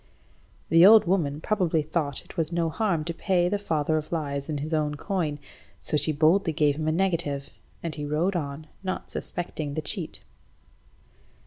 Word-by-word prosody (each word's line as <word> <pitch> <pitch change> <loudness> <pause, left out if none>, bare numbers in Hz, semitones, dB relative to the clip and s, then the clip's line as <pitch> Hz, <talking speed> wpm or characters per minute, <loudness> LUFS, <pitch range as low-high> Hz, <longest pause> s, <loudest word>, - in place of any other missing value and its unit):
The 165 +1 +6
old 215 +3 +9
woman 160 -5 0
probably 175 -7 +1
thought 150 -3 -2
it - - -14
was 165 0 -1
no 170 -1 0
harm 180 -6 0
to 170 - -3
pay 175 0 +1
the 205 +2 0
father 160 -5 0
of 155 0 -5
lies 140 -3 -3
in 150 - -1
his 155 +3 -4
own 150 -1 0
coin, 160 -3 -2 0.4
so - - -3
she 150 +1 +2
boldly 160 +4 +3
gave 145 -1 +2
him 155 +1 -3
a - - +3
negative, 165 -6 -1 0.3
and 165 -2 -3
he 150 - -5
rode 165 +6 0
on, 145 -2 -4 0.2
not 185 -1 -4
suspecting 155 -4 -4
the 155 - -1
cheat. - - -3
160 Hz, 180 wpm, -26 LUFS, 150-175 Hz, 0.4 s, old